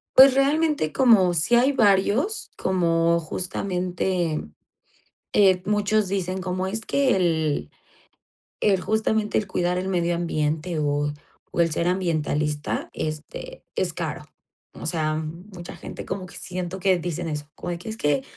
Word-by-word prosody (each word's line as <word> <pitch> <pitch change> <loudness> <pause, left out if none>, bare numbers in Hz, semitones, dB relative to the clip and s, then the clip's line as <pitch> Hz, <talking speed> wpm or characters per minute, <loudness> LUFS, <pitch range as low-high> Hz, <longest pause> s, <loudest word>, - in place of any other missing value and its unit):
Pues, 265 0 +9
realmente 285 - +2
como 215 -9 +5
sí 175 +8 +3
hay 260 +4 +4
varios, 215 - +3
como 170 -2 +2
justamente, 180 -1 -2 0.9
eh, 190 -3 +5
muchos 210 0 +2
dicen 185 -1 -2
como 185 +1 -2
es 215 +3 -2
que 265 -1 +2
el 160 - 0 0.9
el 195 -3 +3
justamente 220 +1 0
"El 215 - 0
cuidar 180 -1 -1
el 185 +1 -2
medio 175 -2 +1
ambiente 160 0 -1
o 145 0 0 0.4
o - - -1
el 170 -1 +4
ser 170 - 0
ambientalista, 155 -5 -1
este, 155 - -6
es - - 0
caro", - - -4 0.5
o - - -9
sea, 155 -2 0
mucha 170 +4 -7
gente - - -8
como 190 0 -4
que 185 - -11
siento 180 0 -5
que 185 -1 +3
dicen 175 0 -3
eso, 150 -2 -4
como - - -5
de 170 - -4
que 180 - -8
es 220 - -5
que: 145 -7 +1
180 Hz, 145 wpm, -24 LUFS, 165-200 Hz, 0.9 s, Pues